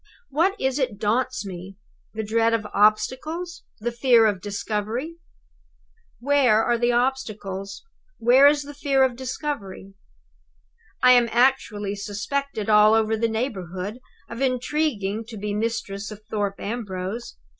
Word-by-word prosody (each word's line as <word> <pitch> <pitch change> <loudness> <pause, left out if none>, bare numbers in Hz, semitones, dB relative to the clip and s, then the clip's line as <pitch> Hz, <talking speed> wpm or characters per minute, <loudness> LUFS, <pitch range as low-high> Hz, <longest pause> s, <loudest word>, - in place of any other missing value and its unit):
"What 365 +8 +1
is 265 +1 0
it 250 -6 -1
daunts 230 +2 0
me? 185 0 -8 0.4
The 220 - -2
dread 225 +2 +2
of 220 -2 -3
obstacles? 305 - +1
The 240 +3 -2
fear 235 -1 +4
of 205 -4 +1
discovery? 215 - -3 1.0
"Where 250 -5 +3
are 240 - +2
the 240 +1 +1
obstacles? 215 -6 -2 0.3
Where 255 +5 +6
is 290 0 +3
the 290 +1 -9
fear 275 -2 +2
of 255 -2 +1
discovery? 245 -7 -5 1.1
"I 250 - +8
am 245 -2 +5
actually 230 -5 +1
suspected 215 +4 -3
all 215 0 +6
over 220 0 +2
the 230 +1 0
neighborhood 205 -3 -4 0.3
of 230 +2 -7
intriguing 250 -5 -1
to 225 -1 -9
be 205 0 -3
mistress 210 -2 -3
of 215 0 -10
Thorpe 205 -2 -2
Ambrose. 200 - -5
230 Hz, 135 wpm, -24 LUFS, 205-260 Hz, 1.1 s, I